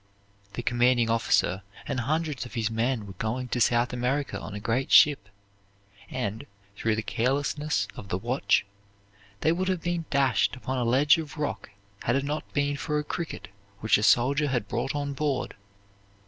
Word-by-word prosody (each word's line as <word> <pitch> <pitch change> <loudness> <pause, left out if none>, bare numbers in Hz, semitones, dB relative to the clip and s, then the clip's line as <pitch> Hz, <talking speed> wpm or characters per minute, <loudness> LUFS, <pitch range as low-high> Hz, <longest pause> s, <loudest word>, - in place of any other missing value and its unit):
The 120 - -4
commanding 120 -1 +3
officer 105 -4 +2 0.3
and - - -1
hundreds 150 +2 -1
of 125 - -10
his 115 -1 0
men 115 0 0
were 95 - -9
going 125 +3 -2
to 120 - -1
South 120 +2 +3
America 130 +4 -1
on 105 - -7
a - - -4
great 115 +5 -1
ship, 140 -10 +6 0.8
and, 115 +2 -4 0.3
through 110 +1 0
the 110 - -2
carelessness 140 0 0
of 100 - -9
the 90 - 0
watch, 120 +4 +1 0.8
they 160 - +3
would 185 +3 -1
have 185 -3 -1
been 175 -1 -1
dashed 135 -2 +2
upon 130 0 -3
a - - +1
ledge 140 +7 +4
of 155 -1 -7
rock 150 -7 -3 0.3
had 120 - +1
it 135 - +1
not 150 +2 -4
been 145 0 0
for 150 +2 -2
a 150 - 0
cricket 165 +2 -5 0.3
which 110 -1 +4
a - - -2
soldier 140 +7 +4
had 125 -6 -1
brought 120 +6 -2
on 145 -1 -2
board. 140 -1 -1
130 Hz, 175 wpm, -27 LUFS, 115-145 Hz, 0.8 s, ship